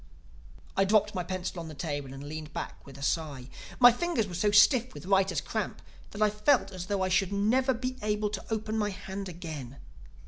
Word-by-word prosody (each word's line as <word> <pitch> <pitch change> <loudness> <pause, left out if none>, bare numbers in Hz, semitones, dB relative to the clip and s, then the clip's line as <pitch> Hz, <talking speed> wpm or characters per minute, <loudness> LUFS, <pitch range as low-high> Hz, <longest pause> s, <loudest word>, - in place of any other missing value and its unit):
I 195 - +4
dropped 210 +1 +3
my 180 - -2
pencil 185 0 -4
on 165 - -6
the 155 - -8
table 145 -2 -4
and 135 +1 -8
leaned 150 +1 -7
back - - -6
with 135 -1 -11
a 140 - -8
sigh. 140 -4 -2 0.3
My 245 -1 +10
fingers 250 -3 0
were 185 - -8
so 190 +5 +2
stiff 240 +5 +5
with - - -9
writers' 195 0 +2
cramp - - -3 0.3
that 210 +1 -1
I 210 - +5
felt 210 +3 +2
as 185 -1 -6
though 200 -2 0
I 185 - 0
should 185 +1 +2
never 245 +6 +2
be 255 +2 -3
able 210 0 0
to 205 - -4
open 220 0 -1
my 210 -1 +1
hand 195 0 -6
again. 155 -7 -7
195 Hz, 210 wpm, -29 LUFS, 165-215 Hz, 0.3 s, My